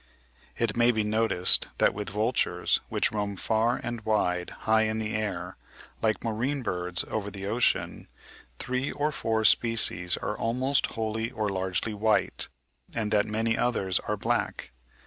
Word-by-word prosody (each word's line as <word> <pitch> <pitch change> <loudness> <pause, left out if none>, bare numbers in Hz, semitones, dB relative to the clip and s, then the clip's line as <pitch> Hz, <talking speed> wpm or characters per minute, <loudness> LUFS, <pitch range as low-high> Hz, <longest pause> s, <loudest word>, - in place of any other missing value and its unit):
(54. - - -1
It 110 0 -3
may 120 +1 +5
be 110 -2 0
noticed 105 -4 +3
that - - +3
with 105 0 -4
vultures, 110 +4 +1
which - - +1
roam 105 -1 -2
far 110 +5 +1
and 120 -1 -4
wide 90 -5 0 0.2
high 110 0 +4
in 110 0 0
the 110 -1 -2
air, 95 -4 -3 0.4
like 110 -1 0
marine 125 +5 -1
birds 90 -3 -2
over 105 -2 -3
the 100 -1 -7
ocean, 115 +4 0 0.5
three 130 - -2
or 150 +1 -1
four 110 -5 -1
species 110 -7 +3
are 105 - -3
almost 130 +5 +1
wholly 110 0 -1
or 110 -4 -2
largely 95 +3 -1
white, 105 +1 0 0.5
and 110 -2 -1
that 105 0 +3
many 110 +1 0
others 100 -8 +1
are - - -3
black. - - -2
110 Hz, 155 wpm, -28 LUFS, 105-115 Hz, 0.5 s, may